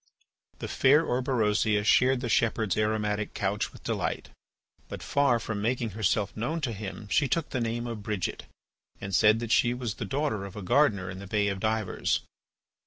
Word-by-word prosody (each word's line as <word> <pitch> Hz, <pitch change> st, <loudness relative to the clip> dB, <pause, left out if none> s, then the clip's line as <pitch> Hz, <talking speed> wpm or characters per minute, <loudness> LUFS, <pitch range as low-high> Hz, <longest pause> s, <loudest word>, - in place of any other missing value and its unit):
The -, -, -5 dB
fair 145 Hz, +4 st, +4 dB
Orberosia 110 Hz, -5 st, +1 dB
shared 125 Hz, +4 st, +4 dB
the 125 Hz, -, -2 dB
shepherd's 110 Hz, -3 st, +1 dB
aromatic 105 Hz, -1 st, -1 dB
couch 100 Hz, +1 st, -1 dB
with -, -, -15 dB
delight, -, -, -2 dB, 0.6 s
but -, -, -7 dB
far 140 Hz, -4 st, +2 dB
from 110 Hz, -2 st, -4 dB
making 120 Hz, 0 st, -1 dB
herself 105 Hz, 0 st, 0 dB
known 150 Hz, +10 st, -2 dB
to 130 Hz, -5 st, -1 dB
him, 105 Hz, +1 st, -7 dB
she 150 Hz, +4 st, +2 dB
took 165 Hz, +6 st, -1 dB
the 130 Hz, -, -1 dB
name 115 Hz, +1 st, -2 dB
of 115 Hz, -3 st, -5 dB
Bridget, 105 Hz, -4 st, -3 dB, 0.5 s
and 100 Hz, 0 st, -6 dB
said 105 Hz, +3 st, +5 dB
that 115 Hz, -1 st, -4 dB
she 120 Hz, 0 st, +3 dB
was 120 Hz, -4 st, -3 dB
the -, -, -5 dB
daughter 135 Hz, -7 st, -1 dB
of 100 Hz, +1 st, -8 dB
a 105 Hz, -, -6 dB
gardener 100 Hz, -4 st, +2 dB
in 95 Hz, -, -8 dB
the 100 Hz, -, -9 dB
Bay 100 Hz, +1 st, +1 dB
of 100 Hz, -1 st, -3 dB
Divers. 110 Hz, -2 st, 0 dB
110 Hz, 180 wpm, -28 LUFS, 105-125 Hz, 0.6 s, said